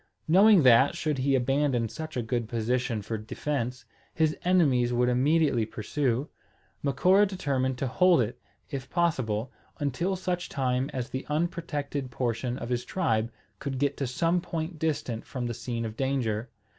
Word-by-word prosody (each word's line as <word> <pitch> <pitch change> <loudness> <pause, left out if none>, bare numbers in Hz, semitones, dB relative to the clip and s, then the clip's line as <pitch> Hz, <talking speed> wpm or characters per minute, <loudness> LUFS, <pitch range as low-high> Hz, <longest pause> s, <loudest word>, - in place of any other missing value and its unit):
Knowing 195 +1 +6
that, 130 +2 +6
should 150 -3 -1
he 135 +1 +2
abandon 135 -2 +1
such 155 +6 -7
a 120 - 0
good 115 0 -2
position 120 -1 -1
for 110 +1 -3
defence, 125 +2 -3 0.3
his 155 -1 +2
enemies 140 -10 +3
would 125 0 +2
immediately 140 0 +3
pursue, 125 +4 -1 0.5
Macora 185 +9 +4
determined 135 -9 -1
to 135 - -2
hold 180 +6 +4
it, 120 +1 -2 0.3
if 135 -2 -5
possible, 130 - 0 0.3
until 160 +7 -1
such 180 -1 -3
time 130 -1 0
as 125 -2 -4
the 130 - -3
unprotected 150 -4 -2
portion 120 0 -2
of 120 - -6
his 125 -1 -1
tribe 115 -10 0 0.3
could 135 -1 -4
get 140 +1 +1
to 135 - -1
some 165 +8 +1
point 165 -1 -4
distant 145 -8 -2
from 125 -3 -5
the 120 - -2
scene 115 0 -4
of 110 -1 -5
danger. 125 -4 -1
130 Hz, 155 wpm, -28 LUFS, 120-155 Hz, 0.5 s, Knowing